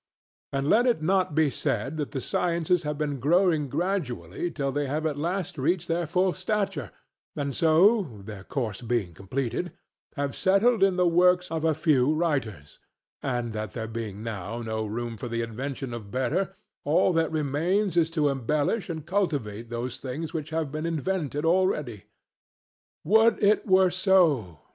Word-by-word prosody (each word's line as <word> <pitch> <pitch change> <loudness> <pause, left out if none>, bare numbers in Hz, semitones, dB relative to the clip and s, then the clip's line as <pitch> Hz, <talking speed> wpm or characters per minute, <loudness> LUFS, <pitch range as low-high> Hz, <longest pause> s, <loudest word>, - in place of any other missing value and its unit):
And 140 0 -1
let 240 +9 +4
it 235 -10 +1
not 185 -2 +1
be 155 -3 +3
said 130 +6 -2
that 150 -2 -2
the 135 -3 -4
sciences 170 +2 0
have 150 -2 -3
been 145 -2 -2
growing 160 +1 +2
gradually 150 - -2
till 140 -4 -2
they 145 +1 -1
have 155 +4 -2
at 155 -2 0
last 170 +1 -3
reached 170 +5 0
their 170 0 -1
full 180 +3 +2
stature, 185 - -2 0.5
and 140 -2 -3
so 165 - +3
(their 105 -3 -8
course 110 -4 -3
being 115 -7 -1
completed) 125 - -3 0.4
have 140 -1 -2
settled 205 +4 +3
in 195 -1 +4
the 180 0 +2
works 180 +1 +3
of 160 -1 -2
a 160 -1 +2
few 150 -4 +3
writers; 135 - -2 0.4
and 120 -3 -2
that 110 -3 -4
there 110 - -4
being 110 -2 -6
now 115 +1 -5
no 110 -1 -3
room 115 +1 -4
for 125 - -5
the 115 0 -2
invention 130 +2 -5
of 110 -4 -7
better, 150 - -1 0.3
all 155 +5 +3
that 165 -2 +2
remains 165 +6 0
is 165 -2 +3
to 155 -3 +1
embellish 145 - -1
and 160 -3 -5
cultivate 145 - -2
those 120 +1 -4
things 145 +5 -5
which 155 -2 -4
have 160 -3 -2
been 155 +2 -3
invented 160 -2 -2
already. 150 - +1 1.0
Would 220 +5 +4
it 210 +2 +3
were 185 -1 +5
so! 165 - +2
150 Hz, 165 wpm, -26 LUFS, 120-175 Hz, 1.0 s, were